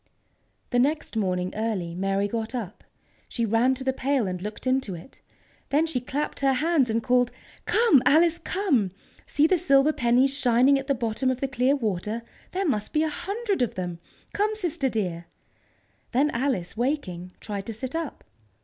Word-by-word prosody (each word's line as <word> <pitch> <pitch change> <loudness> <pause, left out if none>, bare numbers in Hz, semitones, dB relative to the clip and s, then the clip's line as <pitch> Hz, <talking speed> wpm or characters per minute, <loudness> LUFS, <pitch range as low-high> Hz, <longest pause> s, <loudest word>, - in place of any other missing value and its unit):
The 245 - +3
next 290 0 0
morning 185 -4 -1
early, 210 -6 -2
Mary 195 +2 0
got 225 +3 -3
up. 215 -6 -6 0.5
She 235 - -1
ran 230 +4 +3
to 265 - -6
the 265 0 +1
pail 265 -2 0
and 180 -1 -3
looked 210 +4 -6
into 255 -7 0
it. 170 +11 -13 0.5
Then 300 +3 +3
she 315 -7 -2
clapped 285 +4 -3
her 275 -1 +3
hands 295 -2 +2
and 225 +1 0
called: 245 -1 +3 0.4
"Come, 440 - +5
Alice, 335 +2 +4
come! 305 - +1 0.4
See 295 - +3
the 360 +2 +3
silver 280 -2 +4
pennies 255 +3 +3
shining 265 +1 +4
at 270 - -7
the 275 - +2
bottom 235 +2 -1
of 260 -1 -1
the 275 - -1
clear 265 +1 +2
water! 215 -2 -2 0.3
There 385 +1 -1
must 215 - -1
be 305 0 +3
a 315 - 0
hundred 400 - -2
of 245 - 0
them! 175 -2 -4 0.3
Come, 425 +1 +1
sister, 335 -9 -1
dear!" 180 -7 -2 0.9
Then 285 +5 +3
Alice, 235 -8 -1
waking, 205 - -2
tried 200 -2 -5
to 225 - -3
sit 260 +4 -5
up. 325 -3 -4
255 Hz, 175 wpm, -26 LUFS, 215-290 Hz, 0.9 s, Come